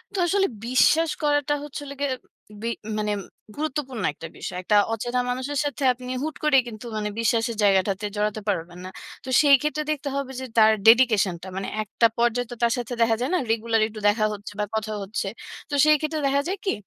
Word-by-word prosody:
তো -, -, -1 dB
আসলে 390 Hz, +2 st, +2 dB, 0.2 s
বিশ্বাস 305 Hz, +6 st, +4 dB
করাটা 290 Hz, 0 st, +2 dB
হচ্ছে, 295 Hz, 0 st, -7 dB
হল 280 Hz, -, -8 dB
গিয়ে 285 Hz, -1 st, 0 dB, 0.5 s
বি 230 Hz, -, -3 dB, 0.3 s
মানে 210 Hz, 0 st, -1 dB, 0.4 s
গুরুত্বপূর্ণ 290 Hz, -5 st, -3 dB
একটা 165 Hz, -, -9 dB
বিষয়। 180 Hz, -, -5 dB
একটা 210 Hz, -, +2 dB, 0.2 s
অচেনা 240 Hz, +3 st, -2 dB
মানুষের 260 Hz, +3 st, -2 dB
সাথে, 285 Hz, 0 st, -3 dB
আপনি 250 Hz, 0 st, -8 dB
হুট 310 Hz, -1 st, -3 dB
করে, 300 Hz, -3 st, +5 dB
কিন্তু 220 Hz, 0 st, -9 dB
মানে 210 Hz, 0 st, -2 dB
বিশ্বাসের 230 Hz, 0 st, +1 dB
জায়গাটাতে 195 Hz, 0 st, +2 dB
জড়াতে 210 Hz, +1 st, -1 dB
পারবেন 175 Hz, -2 st, -3 dB
না। -, -, -6 dB, 0.3 s
তো 260 Hz, -, -8 dB
সেই 285 Hz, -2 st, +7 dB
ক্ষেত্রে 305 Hz, 0 st, -1 dB
দেখতে 290 Hz, -1 st, -3 dB
হবে 275 Hz, -1 st, -3 dB
যে, 260 Hz, -, -5 dB
তার 220 Hz, -1 st, +7 dB, 0.2 s
ডেডিকেশন 225 Hz, -6 st, +5 dB
টা। -, -, -7 dB
মানে 195 Hz, -, -3 dB, 0.2 s
একটা 225 Hz, +2 st, +2 dB
পর্যায়ে 240 Hz, +1 st, +1 dB
তো, -, -, -5 dB
তার 235 Hz, -1 st, +3 dB
সাথে 245 Hz, 0 st, -4 dB
দেখা 225 Hz, -1 st, +4 dB
যায় 255 Hz, -, 0 dB
না, -, -, +2 dB
রেগুলার 225 Hz, 0 st, +1 dB
একটু 215 Hz, 0 st, -9 dB
দেখা 215 Hz, +1 st, +3 dB
হচ্ছে 205 Hz, 0 st, -8 dB
বা 210 Hz, -, +1 dB
কথা 215 Hz, 0 st, -2 dB
হচ্ছে। 200 Hz, +2 st, -3 dB, 0.4 s
তো -, -, -7 dB
সেই 305 Hz, -, +6 dB
ক্ষেত্রে 310 Hz, 0 st, -2 dB
দেখা 280 Hz, +1 st, +2 dB
যায় 385 Hz, +3 st, -2 dB
কি, -, -, +1 dB
240 Hz, 205 wpm, -24 LUFS, 215-285 Hz, 0.5 s, সেই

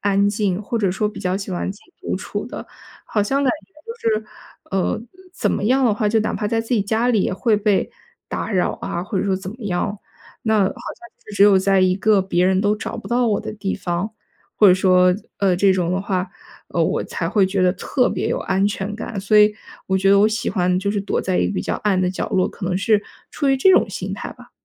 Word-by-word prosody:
安 200 Hz, 0 st, +3 dB
静， 205 Hz, -2 st, -1 dB
或 235 Hz, +3 st, -3 dB
者 200 Hz, -4 st, +1 dB
说 210 Hz, +3 st, 0 dB
比 210 Hz, -, -9 dB
较 180 Hz, 0 st, -1 dB
喜 195 Hz, 0 st, -4 dB
欢 185 Hz, +1 st, -2 dB
自 205 Hz, -, -17 dB
己 -, -, -25 dB
独 -, -, -2 dB
处 -, -, -4 dB
的， -, -, -8 dB, 0.4 s
好 210 Hz, -, 0 dB
像 275 Hz, +7 st, 0 dB
感 265 Hz, -, +3 dB
觉 -, -, -39 dB
就 460 Hz, -, -2 dB
是， 215 Hz, -, -19 dB, 0.4 s
呃， 190 Hz, +1 st, 0 dB, 0.3 s
怎 -, -, -1 dB
么 -, -, -1 dB
样 260 Hz, +5 st, +3 dB
的 215 Hz, -, +2 dB
话， 210 Hz, +1 st, -1 dB
就 225 Hz, -, +3 dB
哪 215 Hz, -, -1 dB
怕 210 Hz, -, -2 dB
在 225 Hz, +2 st, 0 dB
自 225 Hz, -, -9 dB
己 210 Hz, -, +2 dB
家 220 Hz, +4 st, 0 dB
里 220 Hz, -5 st, +3 dB
也 -, -, -1 dB
会 215 Hz, +3 st, +1 dB
被 205 Hz, -1 st, +1 dB, 0.4 s
打 225 Hz, -, -4 dB
扰 185 Hz, -2 st, +1 dB
啊， 170 Hz, -, -3 dB
或 195 Hz, +1 st, -3 dB
者 -, -, 0 dB
说 195 Hz, -, +1 dB
怎 190 Hz, 0 st, -5 dB
么 220 Hz, -, -10 dB
样。 200 Hz, +1 st, -2 dB, 0.4 s
那 220 Hz, -1 st, +2 dB
好 200 Hz, -, +4 dB
像 -, -, -2 dB, 0.5 s
就 -, -, -12 dB
是 205 Hz, -, -7 dB
只 -, -, +5 dB
有 200 Hz, -1 st, +7 dB
在 195 Hz, 0 st, +3 dB
一 185 Hz, 0 st, +3 dB
个 205 Hz, +1 st, +3 dB
别 185 Hz, -2 st, +1 dB
人 190 Hz, +1 st, +3 dB
都 210 Hz, +1 st, +1 dB
找 225 Hz, -, -6 dB
不 -, -, -8 dB
到 245 Hz, 0 st, +2 dB
我 210 Hz, -3 st, +1 dB
的 220 Hz, -, -6 dB
地 200 Hz, -2 st, -3 dB
方， 180 Hz, +3 st, -3 dB, 0.4 s
或 210 Hz, -, +6 dB
者 180 Hz, -, +7 dB
说， 180 Hz, -1 st, +4 dB, 0.2 s
呃， 190 Hz, -3 st, +2 dB
这 195 Hz, +1 st, +4 dB
种 180 Hz, -2 st, 0 dB
的 185 Hz, -, 0 dB
话， 190 Hz, -2 st, -2 dB, 0.4 s
呃， -, -, +1 dB
我 -, -, 0 dB
才 -, -, -4 dB
会 200 Hz, -3 st, +3 dB
觉 190 Hz, 0 st, 0 dB
得 180 Hz, 0 st, +4 dB
特 250 Hz, +6 st, 0 dB
别 -, -, -2 dB
有 -, -, -1 dB
安 190 Hz, +1 st, +1 dB
全 205 Hz, 0 st, -4 dB
感。 220 Hz, -1 st, -6 dB
所 205 Hz, +2 st, +3 dB
以 210 Hz, 0 st, +5 dB, 0.3 s
我 190 Hz, -, +1 dB
觉 195 Hz, +1 st, +3 dB
得 200 Hz, -, +6 dB
我 210 Hz, -, +5 dB
喜 220 Hz, 0 st, -2 dB
欢 180 Hz, -2 st, +1 dB
就 200 Hz, +2 st, -1 dB
是 205 Hz, -1 st, -1 dB
躲 195 Hz, -, -2 dB
在 185 Hz, -1 st, 0 dB
一 -, -, +2 dB
个 -, -, -3 dB
比 -, -, -2 dB
较 -, -, -2 dB
暗 200 Hz, -3 st, 0 dB
的 180 Hz, -1 st, +1 dB
角 185 Hz, -, -4 dB
落， 185 Hz, -, +2 dB
可 185 Hz, -, -6 dB
能 180 Hz, 0 st, 0 dB
是 205 Hz, +2 st, +2 dB, 0.3 s
出 285 Hz, -2 st, -1 dB
于 270 Hz, -, +4 dB
这 270 Hz, +9 st, +5 dB
种 -, -, +4 dB
心 -, -, -5 dB
态 -, -, -6 dB
吧。 -, -, -17 dB
200 Hz, 280 characters per minute, -21 LUFS, 190-215 Hz, 0.5 s, 有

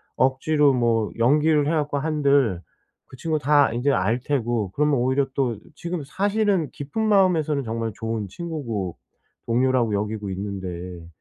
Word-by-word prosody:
억지로 140 Hz, +2 st, +3 dB
뭐 115 Hz, -3 st, +1 dB
연기를 150 Hz, +4 st, +3 dB
해 -, -, +1 dB
갖고 150 Hz, -3 st, 0 dB
한들 140 Hz, -, +1 dB, 0.5 s
그 -, -, -12 dB
친구가 155 Hz, +2 st, -2 dB
다 145 Hz, -1 st, +4 dB
인제 120 Hz, +5 st, 0 dB
알 110 Hz, +2 st, +1 dB
테고 120 Hz, -7 st, -1 dB
그러면 150 Hz, +5 st, +1 dB
오히려 130 Hz, +2 st, +1 dB
또 125 Hz, -5 st, 0 dB, 0.2 s
지금 170 Hz, 0 st, -4 dB
사실은 200 Hz, +1 st, 0 dB
깊은 145 Hz, +10 st, -6 dB
마음에서는 180 Hz, -9 st, +2 dB
정말 115 Hz, -1 st, -3 dB
좋은 115 Hz, -2 st, -3 dB
친구고 115 Hz, -, -5 dB, 0.5 s
동료라고 120 Hz, -1 st, +2 dB
여기고 105 Hz, 0 st, -2 dB
있는데 90 Hz, -3 st, -6 dB
130 Hz, 310 characters per minute, -23 LUFS, 110-150 Hz, 0.5 s, 다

